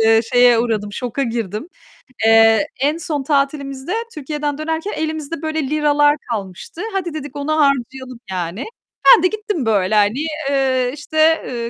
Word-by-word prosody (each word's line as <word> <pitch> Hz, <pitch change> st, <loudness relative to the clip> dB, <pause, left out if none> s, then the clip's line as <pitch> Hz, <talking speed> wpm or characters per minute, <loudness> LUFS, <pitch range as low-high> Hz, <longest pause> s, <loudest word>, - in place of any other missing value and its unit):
eee, 225 Hz, 0 st, +5 dB
şeye 245 Hz, -1 st, +6 dB
uğradım, 215 Hz, -3 st, -1 dB
şoka 250 Hz, +4 st, -3 dB
girdim. 230 Hz, -, -3 dB, 0.6 s
Eee, 225 Hz, -1 st, +5 dB
en 295 Hz, +4 st, +1 dB
son 300 Hz, -4 st, -3 dB
tatilimizde 275 Hz, +1 st, -1 dB, 0.2 s
Türkiye'den 295 Hz, 0 st, -3 dB
dönerken 320 Hz, +5 st, -3 dB
elimizde 315 Hz, 0 st, -4 dB
böyle 315 Hz, -1 st, -2 dB
liralar 295 Hz, -1 st, +3 dB, 0.2 s
kalmıştı. 200 Hz, -, -6 dB
"Hadi" 355 Hz, -4 st, -2 dB
dedik, 290 Hz, -2 st, -7 dB
"onu 285 Hz, +1 st, -3 dB
harcayalım" 265 Hz, -4 st, 0 dB
yani. 180 Hz, +5 st, -4 dB, 0.4 s
Ben 475 Hz, -, +8 dB
de 365 Hz, -, +6 dB
gittim 420 Hz, -, -3 dB
böyle, 205 Hz, -2 st, +1 dB
hani, 215 Hz, +9 st, +2 dB, 0.2 s
eee, 260 Hz, -2 st, +1 dB
işte, 315 Hz, +2 st, +2 dB
eee, 235 Hz, -2 st, -4 dB
275 Hz, 145 wpm, -19 LUFS, 230-310 Hz, 0.6 s, Ben